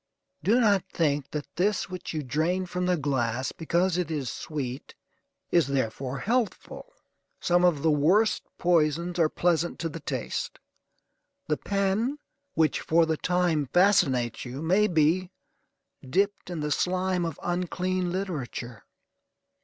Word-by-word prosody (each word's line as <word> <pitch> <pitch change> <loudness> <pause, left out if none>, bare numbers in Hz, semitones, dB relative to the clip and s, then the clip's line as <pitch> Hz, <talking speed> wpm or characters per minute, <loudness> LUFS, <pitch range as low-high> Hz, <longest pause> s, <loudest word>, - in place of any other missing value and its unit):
Do 215 +10 +3
not 205 -6 +4
think 145 -4 0
that 150 -1 -4
this 200 +3 +1
which 185 -1 -6
you 155 -2 -3
drain 165 +8 0
from 180 0 -2
the 180 -1 +2
glass, 130 -4 -1
because 175 +2 0
it 175 -3 -1
is 145 -6 -2
sweet, 135 -4 -5 0.6
is 170 -4 +4
therefore 135 0 -2
healthful: 240 - -2 0.5
some 175 0 +2
of 170 -6 +3
the 160 - +4
worst 180 +10 +3 0.2
poisons 170 +1 +1
are 160 -2 +4
pleasant 175 0 0
to 165 - -3
the 165 - -7
taste. 135 -5 -4 0.9
The 150 - +1
pen 200 +7 0 0.4
which 155 -3 +2
for 165 +1 +3
the 160 0 0
time 175 -5 +1
fascinates 145 - +3
you 130 +4 -6
may 190 +6 +3
be 175 +1 +2 0.8
dipped 200 +6 0
in 170 -3 -4
the 150 0 -2
slime 185 +2 0
of 165 -3 -4
unclean 180 +1 -1
literature. 140 - -4
170 Hz, 140 wpm, -27 LUFS, 150-185 Hz, 0.9 s, not